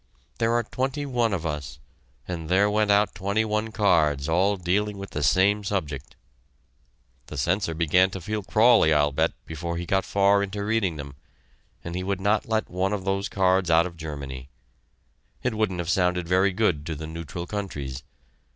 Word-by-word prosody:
There 115 0 +2
are 120 0 +2
twenty 135 +5 -3
one 120 -4 0
of 90 -4 -2
us, 75 -1 -4 0.5
and 80 -3 -5
there 100 +3 +3
went 105 0 +1
out 100 +1 +3
twenty 100 +4 0
one 105 +1 -1
cards 80 -10 +2
all 95 +5 +2
dealing 100 +4 -1
with 100 0 -8
the 75 - -3
same 100 +8 +3
subject. 75 -9 -4 1.1
The - - -8
censor 85 +4 0
began 85 +3 +3
to 95 - -6
feel 105 +5 -3
crawly, 110 -3 +4
I'll 75 -1 +3
bet, 70 - +1
before 85 +2 -4
he 85 - -4
got 95 +2 +1
far 100 0 +3
into 100 +1 -3
reading 105 -6 0
them, 70 -2 -8 0.7
and 85 - -6
he 90 - -2
would 95 0 -2
not 105 +3 +1
let 110 -1 0
one 95 +3 -1
of 95 -3 -3
those 95 0 -1
cards 95 -2 +2
out 85 +1 +5
of 90 -2 -7
Germany. 70 -5 -7 0.9
It 125 - 0
wouldn't 110 -4 -1
have 85 -1 -3
sounded 90 -1 +1
very 95 +3 +3
good 90 -7 +1
to 80 - -3
the 80 +2 -6
neutral 85 +2 -6
countries. 75 -11 -5
95 Hz, 180 wpm, -25 LUFS, 80-105 Hz, 1.1 s, out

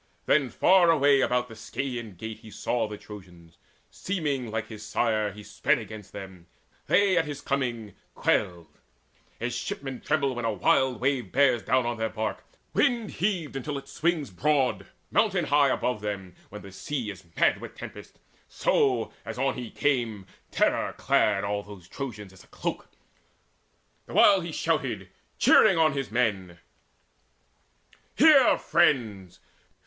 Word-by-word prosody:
Then 140 -3 +3
far 180 +3 +4
away 145 -3 +4
about 125 -1 +1
the 115 - -11
Scaean 120 -1 -5
Gate 110 +3 -7
He 110 - -13
saw 110 +2 -2
the 105 -1 -7
Trojans: 90 -6 -13 0.3
seeming 145 - -3
like 110 0 -3
his 110 -2 -10
sire, 110 -1 0
He 105 +2 -11
sped 145 +7 +1
against 110 -3 -9
them; 95 -3 -10 0.4
they 195 0 +4
at 165 - 0
his 145 -2 -6
coming 120 -8 -3 0.2
quailed. 85 -2 -1 0.6
As 120 +1 -3
shipmen 135 +1 -5
tremble 145 -3 0
when 120 -1 -5
a 115 - +1
wild 130 +2 +2
wave 130 -1 -1
bears 130 -4 +3
Down 130 +1 +1
on 120 0 -2
their 110 0 -1
bark, 110 0 -4 0.3
wind 235 -3 +1
heaved 180 -7 -2
until 140 +2 -4
it 135 - -9
swings 160 - -1
Broad, 130 -3 0 0.2
mountain 195 -6 +2
high 145 -1 +4
above 125 -4 -1
them, 100 -3 -5 0.2
when 105 - -10
the 100 - -11
sea 120 +2 -4
Is 95 - -12
mad - - +3
with - - -9
tempest; - - -10 0.3
so, 125 -4 +1
as - - -7
on 135 +1 +1
he 125 -3 -6
came, 120 -8 -1 0.2
Terror - - +1
clad 100 -2 +2
all 100 0 -1
those 100 -4 -13
Trojans 105 -8 -7
as 95 - -16
a - - -23
cloak, - - -5 1.2
The - - -9
while - - +6
he - - -6
shouted, - - -2 0.3
cheering 195 -5 +6
on 155 -2 +4
his 135 -1 -3
men: 100 -7 -1 1.6
"Hear, 290 -4 +6
friends! 115 - +1
120 Hz, 155 wpm, -27 LUFS, 105-140 Hz, 1.6 s, while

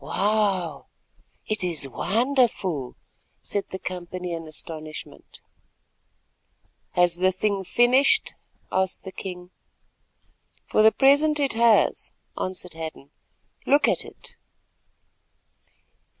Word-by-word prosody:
"Wow, 190 -3 0 0.6
it 215 -2 -2
is 165 -6 +3
wonderful!" 215 - 0 0.5
said 200 - -1
the 190 - -5
company 180 -1 -6
in 165 -1 -6
astonishment. 155 0 -9 1.5
"Has 175 -1 +3
the 185 +1 +3
thing 195 +1 -1
finished?" 255 - +4 0.4
asked 190 0 -1
the 190 - -8
king. 180 -1 -8 1.1
"For - - +2
the 220 +1 +7
present 290 +4 +3
it 280 -3 +1
has," 230 -1 +3 0.2
answered 185 -1 -5
Hadden. 160 -3 -8 0.6
"Look 285 +2 +4
at - - +1
it." - - -11
185 Hz, 95 wpm, -24 LUFS, 175-225 Hz, 1.5 s, the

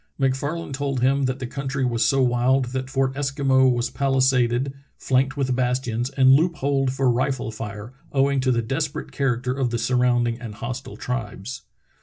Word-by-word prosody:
MacFarlane 140 +4 -1
told 135 -2 -2
him 135 +2 +2
that 130 0 -1
the 130 - -5
country 135 +1 -3
was 120 -2 +1
so 135 +3 +3
wild 125 +2 +2
that 130 0 -3
Fort 135 -1 0
Eskimo 135 -2 +2
was 120 0 -1
palisaded, 130 -1 +1 0.2
flanked 135 +2 +1
with 130 -2 0
bastions, 125 -1 -1
and 135 -1 +5
loop 165 +5 +3
holed 135 -2 0
for 135 0 0
rifle 125 -1 -1
fire, 105 +1 -7 0.2
owing 140 0 +2
to 130 0 +1
the 120 -1 +1
desperate 150 +5 -3
character 125 -2 -1
of 130 -2 -1
the 120 - -1
surrounding 120 -1 +1
and 110 -3 -7
hostile 125 +4 -6
tribes. 115 0 -5
130 Hz, 170 wpm, -23 LUFS, 120-135 Hz, 0.2 s, and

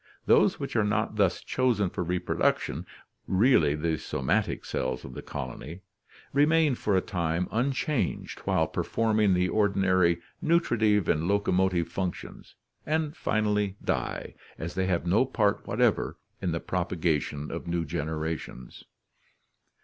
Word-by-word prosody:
Those - - +4
which - - -5
are 110 - +3
not 105 +1 0
thus 95 -3 +2
chosen 115 -8 +1
for - - -2
reproduction, 85 -2 -1 0.4
really 95 - +4
the 80 +1 -1
soma 65 - +1
tic - - -6
cells 65 - -3
of 65 - -9
the - - -7
colony, 85 +6 -7 0.5
remain 150 +1 +4
for 105 -5 +1
a - - +3
time 85 -2 -1
unchanged 130 +3 -1
while - - +1
performing 110 -4 +1
the 90 0 +2
ordinary 95 -4 +2 0.2
nutritive 110 - +2
and 80 +2 +1
locomotive 95 -3 +2
functions, 90 +1 -5 0.3
and 155 0 -1
finally 105 - 0
die, - - -2 0.2
as 85 +2 -5
they 95 0 0
have 90 -2 0
no 95 +8 +4
part 110 -6 0
whatever 110 +2 +1 0.2
in 90 - -1
the 85 - -1
propagation 80 -5 -1
of 85 +1 -6
new 85 -1 -1
generations. 80 -4 -5
95 Hz, 135 wpm, -28 LUFS, 85-110 Hz, 0.5 s, Those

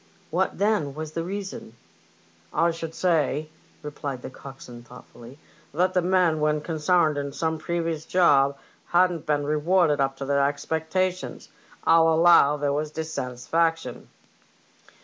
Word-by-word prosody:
" - - -33
What, - - 0
then, 200 -10 0
was 155 0 -6
the 165 +1 -3
reason? 190 - -6 0.2
" 85 0 -33
" 85 +1 -32
I 170 - +3
should 165 -1 -7
say," 155 -4 0 0.3
replied 145 -3 -6
the - - -7
coxswain, 130 -3 -11
thoughtfully, 120 +1 -14 0.4
"that 180 +3 +2
the 180 - +2
men 180 -3 +2
when 150 0 +1
consarned 160 -1 +1
in 140 0 -4
some 160 +2 -2
previous 165 -2 -2
job 140 -6 +3 0.3
hadn't 175 -2 +2
been 145 -1 +1
rewarded 155 0 +2
up 135 0 -1
to 135 - -5
their 140 0 +2
expectations. 160 +5 -3 0.4
1*11 165 0 +5
allow 165 -3 +5
there 145 -1 -1
was 150 +1 -2
dissatisfaction." 160 -1 -2
155 Hz, 145 wpm, -25 LUFS, 140-170 Hz, 0.4 s, 1*11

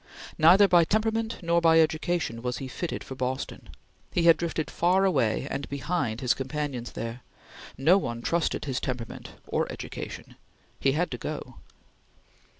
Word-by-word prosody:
Neither 180 +6 +7
by 175 -3 +6
temperament 220 +4 0
nor 170 0 +2
by 165 -1 +6
education 160 -6 0
was 125 0 -2
he 135 - -5
fitted 165 +6 -4
for - - -8
Boston. 130 +1 -4 0.4
He 175 - +1
had 165 -1 +7
drifted 165 -2 -3
far 185 +3 +3
away 130 - +1
and 140 0 -4
behind 140 -5 -2
his 125 -2 +3
companions 135 -3 -4
there; 115 +2 -5 0.6
no 165 +9 +5
one 120 -8 -4
trusted 170 -3 0
his 130 -3 -1
temperament 125 -3 -5
or - - -1
education; - - -8 0.4
he 135 - +2
had 175 +4 0
to 125 - -5
go. - - -6
150 Hz, 150 wpm, -27 LUFS, 130-175 Hz, 0.6 s, Neither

